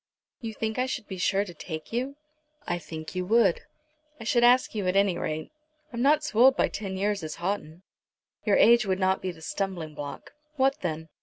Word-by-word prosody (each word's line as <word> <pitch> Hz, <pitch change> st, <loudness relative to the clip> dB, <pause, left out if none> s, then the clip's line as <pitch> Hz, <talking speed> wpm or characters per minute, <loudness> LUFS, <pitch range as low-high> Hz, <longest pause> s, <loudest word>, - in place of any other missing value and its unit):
"You 225 Hz, -2 st, -6 dB
think 220 Hz, +2 st, -2 dB
I 255 Hz, -, +1 dB
should 235 Hz, -, -4 dB
be 190 Hz, -2 st, -6 dB
sure 195 Hz, +2 st, +2 dB
to 175 Hz, -, -9 dB
take 160 Hz, +3 st, -7 dB
you." 260 Hz, +4 st, -2 dB, 0.5 s
"I 175 Hz, 0 st, -1 dB
think 160 Hz, -1 st, -8 dB
you 185 Hz, 0 st, -2 dB
would. 220 Hz, -4 st, +4 dB, 0.6 s
I -, -, -7 dB
should 240 Hz, +1 st, +2 dB
ask 250 Hz, +1 st, +5 dB
you 205 Hz, -4 st, -2 dB
at 180 Hz, -, +1 dB
any 195 Hz, -2 st, +3 dB
rate. 155 Hz, -, -4 dB, 0.4 s
I'm 235 Hz, -, -3 dB
not 300 Hz, +3 st, +4 dB
so 235 Hz, -7 st, -2 dB
old 265 Hz, +2 st, +7 dB
by -, -, +3 dB
ten 195 Hz, -2 st, -5 dB
years 200 Hz, 0 st, 0 dB
as 155 Hz, -1 st, -5 dB
Houghton." 175 Hz, -2 st, -4 dB, 0.6 s
"Your 205 Hz, -, +3 dB
age 235 Hz, +2 st, +6 dB
would 190 Hz, 0 st, 0 dB
not 190 Hz, 0 st, +2 dB
be 185 Hz, -, -2 dB
the 160 Hz, -2 st, -14 dB
stumbling 175 Hz, -5 st, -3 dB
block." 145 Hz, -1 st, -8 dB, 0.2 s
"What 270 Hz, 0 st, +2 dB
then?" 160 Hz, -2 st, -3 dB
195 Hz, 210 wpm, -27 LUFS, 175-235 Hz, 0.6 s, old